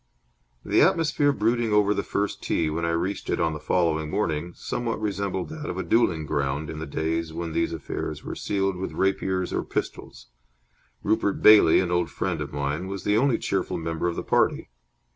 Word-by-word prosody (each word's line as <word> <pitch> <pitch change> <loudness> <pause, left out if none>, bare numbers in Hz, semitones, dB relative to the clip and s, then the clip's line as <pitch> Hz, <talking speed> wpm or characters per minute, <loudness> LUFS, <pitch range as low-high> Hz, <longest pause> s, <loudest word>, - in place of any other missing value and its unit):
The - - +3
atmosphere 150 -3 +3
brooding 115 -2 +1
over 105 -1 +4
the 100 - -1
first 100 +1 -2
tee 80 -2 0
when 85 +2 -2
I - - 0
reached 90 +4 -2
it - - 0
on 80 -1 +1
the 75 - -5
following 80 -2 0
morning, 85 -2 -1
somewhat 120 -2 -3
resembled 100 -3 -2
that 155 -1 -6
of 90 - -4
a 95 - -2
duelling 90 -9 +2
ground 70 +1 -2
in 75 - -7
the 80 - -5
days 80 +2 -2
when 85 -1 -4
these 85 - 0
affairs 80 -4 -5
were - - -5
sealed 95 -2 -1
with 95 - -4
rapiers 95 -1 0
or - - 0
pistols. - - -5 0.8
Rupert 100 -2 0
Bailey, 105 -6 +8
an 90 -2 -2
old 90 -3 +1
friend - - -2
of - - -5
mine, 70 +5 -2
was 95 -1 -5
the 105 - +2
only 125 +2 +3
cheerful 95 -1 -2
member 80 +1 -2
of 85 - -1
the - - -4
party. - - +1
90 Hz, 195 wpm, -25 LUFS, 80-105 Hz, 0.8 s, Bailey